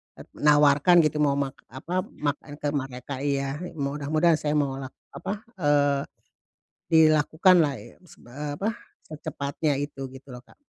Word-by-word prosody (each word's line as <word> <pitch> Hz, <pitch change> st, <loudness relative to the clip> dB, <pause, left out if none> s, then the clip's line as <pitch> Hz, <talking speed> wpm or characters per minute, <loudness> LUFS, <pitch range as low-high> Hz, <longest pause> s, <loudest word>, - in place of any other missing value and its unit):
eee, -, -, -12 dB
menawarkan 150 Hz, +2 st, +4 dB
gitu 155 Hz, 0 st, 0 dB
mau 145 Hz, -2 st, +3 dB
mak 140 Hz, -2 st, -3 dB
apa, 130 Hz, +7 st, -8 dB
mak 145 Hz, -1 st, -3 dB
en 145 Hz, -, -8 dB
ke 145 Hz, 0 st, -2 dB
mereka 135 Hz, -1 st, -5 dB
iya, 140 Hz, 0 st, -1 dB, 0.2 s
mudah-mudahan 150 Hz, +3 st, +1 dB
saya 150 Hz, 0 st, -1 dB
mau 140 Hz, -2 st, 0 dB
lak 135 Hz, -1 st, -8 dB, 0.2 s
apa, 210 Hz, +2 st, -6 dB, 0.2 s
eee, 145 Hz, -3 st, +2 dB, 0.9 s
dilakukanlah 155 Hz, +1 st, +5 dB
i -, -, -14 dB
seb 160 Hz, -, -18 dB
eee, 145 Hz, +4 st, -5 dB
apa, 205 Hz, -, 0 dB, 0.4 s
secepatnya 150 Hz, -1 st, -3 dB
itu 145 Hz, -1 st, -5 dB
gitu 135 Hz, +1 st, -13 dB
loh, 125 Hz, -1 st, -10 dB
Kak. -, -, -22 dB
145 Hz, 150 wpm, -26 LUFS, 140-155 Hz, 0.9 s, dilakukanlah